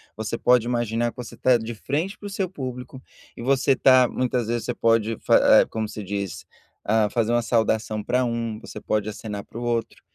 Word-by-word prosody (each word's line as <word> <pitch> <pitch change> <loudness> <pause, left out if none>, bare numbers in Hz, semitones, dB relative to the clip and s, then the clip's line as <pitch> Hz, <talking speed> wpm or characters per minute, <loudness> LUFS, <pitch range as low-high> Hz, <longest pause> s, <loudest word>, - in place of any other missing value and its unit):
você 110 +2 -3
pode 125 -2 +3
imaginar 120 -1 0
que - - -30
você 125 -2 -8
tá 130 -1 +3
de 115 +1 -6
frente 150 - -3
para 205 - -8
o - - -6
seu 195 -1 -2
público, 130 -4 -7 0.3
e - - -9
você 135 +2 +2
tá 130 -1 +5
muitas 125 -1 -1
vezes 120 -1 -1
você - - -2
pode 115 -1 +1
fa - - +5
como 110 -1 -3
se 105 - -7
diz, 100 -2 -4 0.4
ah, 110 0 +2
fazer 115 0 0
uma 120 - +3
saudação 110 -2 0
para 125 +4 +1
um, 115 -2 -3
você - - -9
pode 105 -1 -1
acenar 105 -1 -6
para 115 - -10
o - - -5
outro, 120 -1 -2
115 Hz, 205 wpm, -24 LUFS, 110-125 Hz, 0.4 s, tá